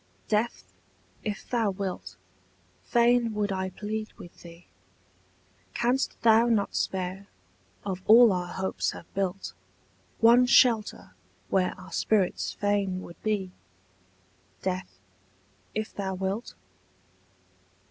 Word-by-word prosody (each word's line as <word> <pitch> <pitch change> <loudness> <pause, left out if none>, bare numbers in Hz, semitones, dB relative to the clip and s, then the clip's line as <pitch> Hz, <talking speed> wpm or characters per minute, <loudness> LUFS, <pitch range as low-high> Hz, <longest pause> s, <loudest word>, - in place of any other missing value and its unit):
DEATH, 220 +2 0 0.6
if 210 -1 -5
thou 230 -4 +1
wilt, 185 - -5 0.7
fain 235 -1 +3
would 205 -1 0
I 190 0 -2
plead 215 +3 -5
with 175 - -14
thee: 170 0 -13 1.1
Canst 250 +3 0
thou 230 +1 +6
not 220 -4 +1
spare, 190 +1 -2 0.6
of 190 -2 -3
all 230 +1 +8
our 180 -1 -2
hopes 190 +2 -2
have - - -12
built, 195 0 -3 0.7
One 240 +2 +6
shelter 230 -3 +3 0.4
where 185 -1 0
our 185 +1 -12
spirits 195 0 +1
fain 200 -2 -1
would 170 - -12
be, 205 -4 -1 1.1
Death, 185 0 -3 0.8
if 215 0 -3
thou 190 -1 -3
wilt? 195 +5 -3
200 Hz, 105 wpm, -27 LUFS, 185-225 Hz, 1.1 s, all